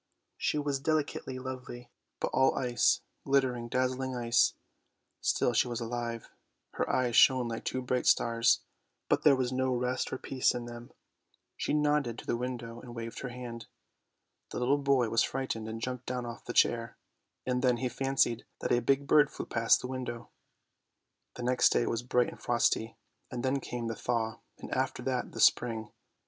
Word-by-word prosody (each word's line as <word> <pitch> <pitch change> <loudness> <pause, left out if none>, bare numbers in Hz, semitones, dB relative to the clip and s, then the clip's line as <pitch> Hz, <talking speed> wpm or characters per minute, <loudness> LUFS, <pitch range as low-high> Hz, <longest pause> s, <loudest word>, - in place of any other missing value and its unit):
She - - -1
was 145 -2 -1
delicately 145 -3 -1
lovely, 125 -2 -7 0.3
but - - -1
all 130 +1 +4
ice, 125 -2 +2 0.2
glittering, 130 -3 +1
dazzling 130 +1 -1
ice. 120 -1 +3 0.6
Still 120 - +1
she 120 - +3
was 120 -1 -3
alive, 115 0 -4 0.4
her - - -2
eyes 125 -2 +1
shone 130 -2 +6
like 115 - -5
two 130 - -2
bright 125 0 0
stars, 115 0 +4 0.5
but - - +3
there 145 -3 +6
was 130 -1 -1
no 130 0 +1
rest 125 +1 -1
or 130 - -2
peace 130 -1 0
in 120 -1 -4
them. 120 0 -9 0.6
She - - -1
nodded 150 -5 +1
to - - -9
the - - 0
window 120 -1 -5
and 120 -1 -10
waved 115 0 -6
her 125 - -5
hand. 120 -2 -7 0.8
The - - -6
little 130 +4 +2
boy 135 -4 +2
was 115 +1 +3
frightened 130 -4 -2
and 110 0 -5
jumped 125 +1 -4
down 125 -1 -2
off 120 0 -8
the - - -4
chair, 115 -1 +2 0.5
and 125 -1 0
then 125 -2 +3
he 130 - -1
fancied 135 -2 +1 0.2
that - - -2
a 120 - +4
big 135 +4 +2
bird 145 0 +5
flew - - -6
past 115 0 +3
the - - -4
window. 125 -2 -5 1.0
The 125 - -6
next 125 +1 +4
day 120 - +2
was 115 - -1
bright 125 0 +1
and - - -12
frosty, 115 -1 +1 0.3
and 125 -2 -5
then 135 +1 +1
came 120 -2 -5
the 115 0 -3
thaw 110 -2 -2
— - - -47
and - - -9
after 130 -1 -1
that 125 -1 -2
the - - -7
spring. 110 -3 +3
125 Hz, 185 wpm, -30 LUFS, 120-130 Hz, 1.0 s, shone